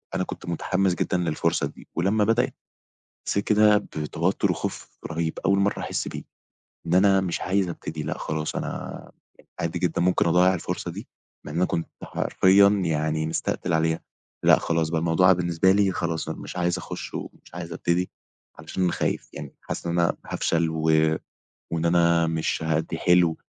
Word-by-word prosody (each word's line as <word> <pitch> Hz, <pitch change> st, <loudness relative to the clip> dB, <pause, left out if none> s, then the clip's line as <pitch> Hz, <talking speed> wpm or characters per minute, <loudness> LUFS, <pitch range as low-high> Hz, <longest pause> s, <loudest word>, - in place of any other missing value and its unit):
أنا -, -, +1 dB
كنت -, -, -7 dB
متحمّس 95 Hz, +2 st, 0 dB
جدًا 90 Hz, -, 0 dB
للفرصة 85 Hz, -3 st, 0 dB
دي، -, -, -14 dB
ولمّا 100 Hz, +5 st, +2 dB
بدأت 115 Hz, +4 st, +1 dB, 0.7 s
حسّيت 100 Hz, -, 0 dB
كده 105 Hz, -1 st, +5 dB
بتوتّر 75 Hz, -6 st, -1 dB
وخوف -, -, -6 dB
رهيب، 80 Hz, -1 st, -3 dB
أول 100 Hz, 0 st, +4 dB
مرّة 100 Hz, +1 st, +1 dB
أحس -, -, -3 dB
بيه، -, -, -6 dB, 0.7 s
إن 85 Hz, -, 0 dB
أنا 95 Hz, +1 st, +5 dB
مش 90 Hz, -2 st, -2 dB
عايز 95 Hz, 0 st, +1 dB
ابتدي، 80 Hz, -2 st, -5 dB
لأ، 75 Hz, -, -3 dB
خلاص 75 Hz, 0 st, -3 dB
أنا -, -, -5 dB, 0.5 s
عادي 85 Hz, +1 st, -2 dB
جدًا 85 Hz, -1 st, 0 dB
ممكن 90 Hz, +1 st, +2 dB
أضيّع 90 Hz, +2 st, +4 dB
الفرصة 85 Hz, -, -4 dB
دي، -, -, -8 dB, 0.4 s
لإن 75 Hz, -, -7 dB
أنا 90 Hz, +2 st, +3 dB
كنت 85 Hz, -, -2 dB, 0.2 s
حرفيًا 100 Hz, +1 st, +4 dB
يعني 80 Hz, -5 st, 0 dB
مستقتل 80 Hz, +2 st, -2 dB
عليها. 80 Hz, 0 st, +1 dB, 0.5 s
لأ، -, -, +7 dB
خلاص 80 Hz, -1 st, 0 dB
بقى، 80 Hz, 0 st, 0 dB
الموضوع 85 Hz, +3 st, +4 dB
بالنسبة 85 Hz, +1 st, +2 dB
لي 100 Hz, 0 st, +3 dB
خلاص، 85 Hz, -3 st, -2 dB
أنا -, -, -4 dB
مش -, -, -8 dB
عايز 90 Hz, 0 st, +1 dB
أخش -, -, -7 dB
ومش -, -, -8 dB
عايز 85 Hz, -1 st, -6 dB
ابتدي، 85 Hz, +2 st, 0 dB, 0.5 s
علشان 90 Hz, +3 st, -1 dB
خايف -, -, -2 dB
يعني، 70 Hz, -, -8 dB
حاسس -, -, -6 dB
إن 85 Hz, +1 st, 0 dB
أنا 85 Hz, -, +2 dB
هافشل، 85 Hz, 0 st, 0 dB
و 80 Hz, 0 st, -3 dB, 0.9 s
وإن 80 Hz, 0 st, -1 dB
أنا 85 Hz, -1 st, +4 dB
مش 80 Hz, 0 st, -1 dB
هأدّي 80 Hz, +1 st, -1 dB
حلو، 90 Hz, -2 st, +4 dB
85 Hz, 165 wpm, -25 LUFS, 80-95 Hz, 0.9 s, لأ